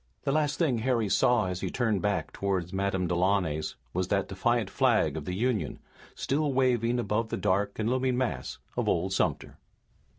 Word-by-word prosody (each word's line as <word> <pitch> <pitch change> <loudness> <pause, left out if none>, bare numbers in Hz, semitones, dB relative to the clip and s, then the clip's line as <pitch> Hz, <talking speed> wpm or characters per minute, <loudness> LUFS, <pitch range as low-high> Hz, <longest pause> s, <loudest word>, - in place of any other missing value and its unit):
The 140 - 0
last 150 0 +1
thing 140 -9 +1
Harry 115 -3 +1
saw 120 +1 +3
as 90 -1 -3
he - - -2
turned 110 -6 0
back 105 -1 -1
toward 95 -3 -2
Madame 95 -1 0
Delaunay's 90 -3 0 0.2
was 90 +1 -1
that 100 0 0
defiant 110 +3 0
flag - - +2
of 80 -2 -5
the 90 - -3
Union, 120 +1 -1 0.4
still 145 +2 0
waving 125 -2 +2
above 115 -1 -1
the - - -2
dark 100 0 0
and 110 - -1
looming 130 0 +1
mass 115 - -2 0.2
of - - 0
old - - 0
Sumter. - - -1
105 Hz, 175 wpm, -28 LUFS, 95-125 Hz, 0.4 s, saw